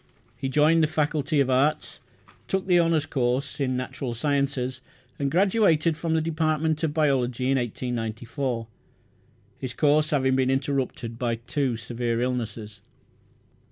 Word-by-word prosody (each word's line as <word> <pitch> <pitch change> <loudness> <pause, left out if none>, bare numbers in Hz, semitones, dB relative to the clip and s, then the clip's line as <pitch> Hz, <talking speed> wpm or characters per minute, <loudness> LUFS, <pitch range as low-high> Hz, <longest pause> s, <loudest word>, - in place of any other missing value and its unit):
He 130 +3 -3
joined 150 +4 +4
the 155 - +4
Faculty 150 -1 0
of 130 -1 +1
Arts, 140 +4 +1 0.5
took 190 0 -1
the 180 -2 +4
honours 165 -3 +2
course 135 0 -1
in 130 -2 0
natural 125 -1 -4
sciences, 135 -1 -1 0.4
and 140 -1 0
graduated 175 -3 +3
from 165 0 -1
the 160 - +2
department 155 -1 0
of 160 - +1
biology 135 -4 +1
in 135 - +3
1894, 120 +1 -3 0.9
his 125 -2 -5
course 150 0 +3
having 130 -3 +2
been 130 -1 +2
interrupted 135 -4 -2
by 120 -2 0
two 125 +1 -2
severe 115 0 -2
illnesses. 115 -4 -3
135 Hz, 135 wpm, -25 LUFS, 125-155 Hz, 0.9 s, joined